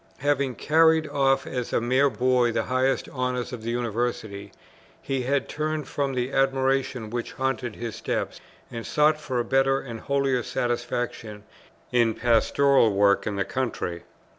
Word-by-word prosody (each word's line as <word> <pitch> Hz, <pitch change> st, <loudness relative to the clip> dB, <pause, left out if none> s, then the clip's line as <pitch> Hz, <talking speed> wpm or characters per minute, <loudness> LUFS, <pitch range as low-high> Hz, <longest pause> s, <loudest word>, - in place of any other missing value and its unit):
Having 140 Hz, -3 st, 0 dB
carried 160 Hz, 0 st, +3 dB
off 135 Hz, -2 st, +2 dB
as 125 Hz, -2 st, -4 dB
a -, -, +2 dB
mere 130 Hz, +4 st, +3 dB
boy 125 Hz, -2 st, +2 dB
the -, -, 0 dB
highest 130 Hz, +1 st, 0 dB
honours 125 Hz, -1 st, -3 dB
of 120 Hz, -, -6 dB
the 115 Hz, -, -4 dB
University, 115 Hz, -4 st, -3 dB, 0.5 s
he 135 Hz, -1 st, -2 dB
had 135 Hz, +2 st, 0 dB
turned 155 Hz, -1 st, -3 dB
from 140 Hz, -2 st, -2 dB
the 125 Hz, +1 st, -1 dB
admiration 135 Hz, -4 st, +1 dB
which 120 Hz, 0 st, -4 dB
haunted 130 Hz, -3 st, -2 dB
his 115 Hz, -2 st, -5 dB
steps, -, -, -3 dB, 0.3 s
and 115 Hz, -1 st, -5 dB
sought 150 Hz, +3 st, +2 dB
for 130 Hz, -4 st, -2 dB
a 120 Hz, -, -1 dB
better 135 Hz, 0 st, +2 dB
and 115 Hz, -3 st, -7 dB
holier 135 Hz, -2 st, 0 dB
satisfaction 120 Hz, -3 st, -3 dB, 0.5 s
in 120 Hz, -2 st, +3 dB
pastoral 120 Hz, +1 st, +3 dB
work 100 Hz, 0 st, +3 dB
in 105 Hz, -, -2 dB
the 100 Hz, -1 st, -1 dB
country. 115 Hz, -9 st, -3 dB
125 Hz, 155 wpm, -25 LUFS, 120-135 Hz, 0.5 s, carried